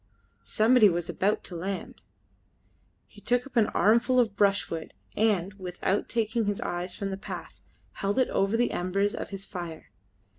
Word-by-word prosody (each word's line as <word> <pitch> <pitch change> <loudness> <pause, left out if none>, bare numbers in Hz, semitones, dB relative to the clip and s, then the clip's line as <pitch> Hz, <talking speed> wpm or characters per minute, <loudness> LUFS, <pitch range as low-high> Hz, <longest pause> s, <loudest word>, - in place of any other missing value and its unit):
Somebody 220 0 +5
was 175 -1 -2
about 205 +3 0
to 180 - -7
land! 190 +3 -5 1.0
He - - -17
took 245 0 +1
up 275 - -14
an 225 -3 +4
armful 235 +4 +3
of 220 -4 +2
brushwood, 195 -6 0 0.2
and, 200 -4 +1
without 185 +2 -2
taking 225 0 0
his 205 -1 -1
eyes 175 +1 -3
from 195 -1 -3
the 190 - -3
path, 195 - -8 0.3
held 200 +1 -2
it 260 - +3
over 195 +3 +1
the 240 - +2
embers 195 +3 0
of - - -5
his 195 -1 -6
fire. 170 - -7
200 Hz, 160 wpm, -28 LUFS, 185-225 Hz, 1.0 s, Somebody